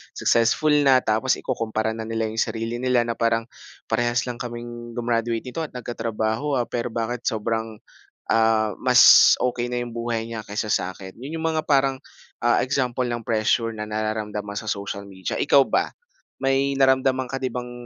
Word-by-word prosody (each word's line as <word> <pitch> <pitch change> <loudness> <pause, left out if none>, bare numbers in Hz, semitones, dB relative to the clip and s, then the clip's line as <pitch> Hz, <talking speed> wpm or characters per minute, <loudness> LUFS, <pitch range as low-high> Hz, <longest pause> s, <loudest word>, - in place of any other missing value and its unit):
successful 115 +7 +2 0.2
na, 130 -1 +5
tapos 110 +4 +1
ikukumpara 110 -3 -2
na 110 0 -6
nila 115 -1 -2
'yong 110 - -4
sarili 115 +1 -2
nila 125 -1 +2
na, 120 - -2
"Parang 115 0 +1 0.5
parehas 120 +2 +1
lang 125 -1 -6
kaming 120 -1 -7
gumraduate 115 -1 -1
nito 130 +5 -6
at - - -23
nagkatrabaho, 115 +2 -2
ah, 125 - +1
pero 120 0 -3
bakit 120 +1 -3
sobrang, 110 -1 -2 0.6
ah, 110 -2 +2
mas - - +7
okey 120 -1 -1
na 125 - -1
yung 120 -1 -5
buhay 115 -1 -2
niya 115 -1 -6
kaysa 105 +1 -4
sa'kin?" 95 +1 -4
Yun 155 +5 -5
yung 160 - -2
mga 155 - 0
parang, 135 -2 +1 0.4
ah, 120 0 +3
example 130 -2 0
ng 120 -1 -3
pressure 115 +1 +1
na 105 -1 -6
nararamdaman 105 -1 -3
sa - - -8
social 100 -1 -4
media. 95 -2 -5
Ikaw 140 -1 +5
ba - - -1 0.5
may 135 +1 +2
naramdaman 130 -1 +2
ka 135 - -3
din 130 -2 -3
bang 125 -1 -5
115 Hz, 170 wpm, -23 LUFS, 110-125 Hz, 0.6 s, mas